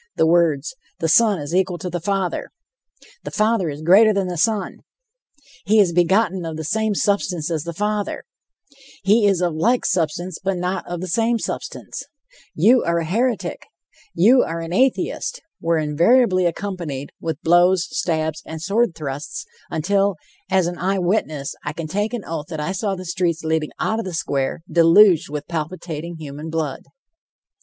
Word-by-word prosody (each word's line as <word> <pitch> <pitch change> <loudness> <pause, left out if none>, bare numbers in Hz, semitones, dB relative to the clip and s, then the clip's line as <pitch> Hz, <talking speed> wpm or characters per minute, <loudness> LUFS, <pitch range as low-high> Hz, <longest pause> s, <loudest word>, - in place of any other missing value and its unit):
The - - +3
words, 165 - +2 0.2
"The 165 - -1
Son 210 +4 +4
is 145 +1 -6
equal 185 -1 +1
to 180 - -6
the 175 - -2
Father," 190 +1 -2 0.7
"The - - -5
Father 215 -5 +1
is 145 +1 -7
greater 200 +6 +6
than 195 -3 0
the 180 - -3
Son," 205 +4 0 0.9
"He 215 +2 +4
is 185 -4 +4
begotten 185 +2 +2
of 160 -1 -5
the 160 - -4
same 220 +5 0
substance 180 -5 0
as 160 -2 -2
the 170 - -4
Father," 210 +2 -2 0.8
"He 205 +2 +4
is 195 -3 +2
of 175 -2 +1
like 235 +11 +1
substance, 175 0 -1
but 190 -1 0
not 180 +2 -3
of 175 -1 -5
the 185 - -4
same 230 +6 +1
substance," - - -5 0.5
"You 245 +2 +5
are 170 0 +1
a 165 - -1
heretic," 230 +7 -1 0.5
"You 235 +9 +6
are 165 +1 -2
an 165 +1 -5
atheist," 265 - 0 0.2
were 165 0 +1
invariably 185 - +3
accompanied 170 -7 -4
with 160 -2 -3
blows, 175 +2 +4
stabs 160 -2 -1
and 160 - -7
sword 200 +2 +1
thrusts, 145 -1 -5 0.2
until, 195 +4 +1 0.3
as 190 -2 +3
an 175 +1 -4
eye 190 +2 0
witness, 175 -7 -1
I 150 - -4
can 165 +1 -5
take 205 +8 -2
an 225 - -6
oath 160 -2 -5
that 160 -3 -6
I 150 +5 -2
saw 195 +1 -2
the 185 0 -8
streets 175 -2 -1
leading 160 -1 0
out 220 - 0
of 225 - -4
the 185 -3 -4
square 140 0 -2
deluged 170 +1 +5
with 145 0 -5
palpitating 170 0 -5
human 150 0 -7
blood. 160 -4 -3
175 Hz, 170 wpm, -21 LUFS, 160-200 Hz, 0.9 s, greater